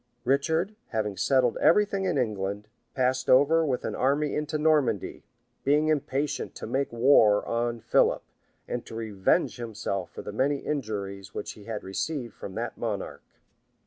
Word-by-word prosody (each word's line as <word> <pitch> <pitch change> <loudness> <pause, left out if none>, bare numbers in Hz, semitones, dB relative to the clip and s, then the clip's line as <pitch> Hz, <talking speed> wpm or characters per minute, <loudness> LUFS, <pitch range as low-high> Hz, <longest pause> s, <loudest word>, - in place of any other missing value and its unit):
[*] 120 - -44
Richard, 160 - +1
having 105 -3 -2
settled 130 +1 +2
every 210 +6 +5
thing 195 -1 -3
in 180 -6 0
England, 105 -4 -2 0.3
passed 130 0 0
over 145 +5 +5
with 135 -5 -1
an - - -2
army 145 +3 +1
into 150 0 -2
Normandy; 150 - +1 0.4
being 150 +3 +3
impatient 145 -1 -1
to - - -6
make 135 +1 -1
war 115 -4 +5
on 120 0 -1
Philip, - - +2 0.4
and 120 -1 -3
to - - -8
revenge 110 -2 0
himself 105 -5 -4
for - - -9
the 105 - -6
many 140 +6 +1
injuries 100 -9 -4
which - - -4
he 105 - -14
had 110 -2 -5
received 120 +4 -3
from 95 - -9
that 115 0 -4
monarch. 105 -4 -4
125 Hz, 160 wpm, -27 LUFS, 105-145 Hz, 0.4 s, every